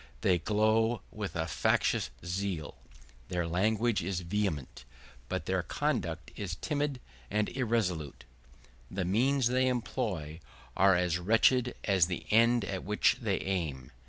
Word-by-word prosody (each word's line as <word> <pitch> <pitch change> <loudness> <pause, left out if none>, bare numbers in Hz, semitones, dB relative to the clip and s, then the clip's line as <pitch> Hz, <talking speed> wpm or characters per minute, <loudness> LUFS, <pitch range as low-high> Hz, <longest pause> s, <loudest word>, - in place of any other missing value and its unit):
They 90 -2 +3
glow 110 +5 +2
with 100 -5 -5
a 80 -1 0
factitious 70 -4 +1 0.2
zeal; 90 -3 -3 0.5
their 90 -2 -1
language 110 +6 +1
is 90 +1 -2
vehement, 90 -6 -2 0.5
but - - -2
their - - 0
conduct - - -2
is 95 -4 -4
timid 145 - -2 0.3
and 105 +1 0
irresolute. 105 - -1 0.7
The 95 -1 -2
means 130 +8 +2
they 130 +1 +2
employ 95 -10 -2 0.4
are 95 0 +5
as 90 -1 +1
wretched 115 +6 +3
as 95 -5 +3
the 90 - -4
end 115 0 +4
at 95 -1 -4
which 105 +4 +2
they 105 -5 0
aim. 80 -10 -3
100 Hz, 130 wpm, -31 LUFS, 85-115 Hz, 0.7 s, are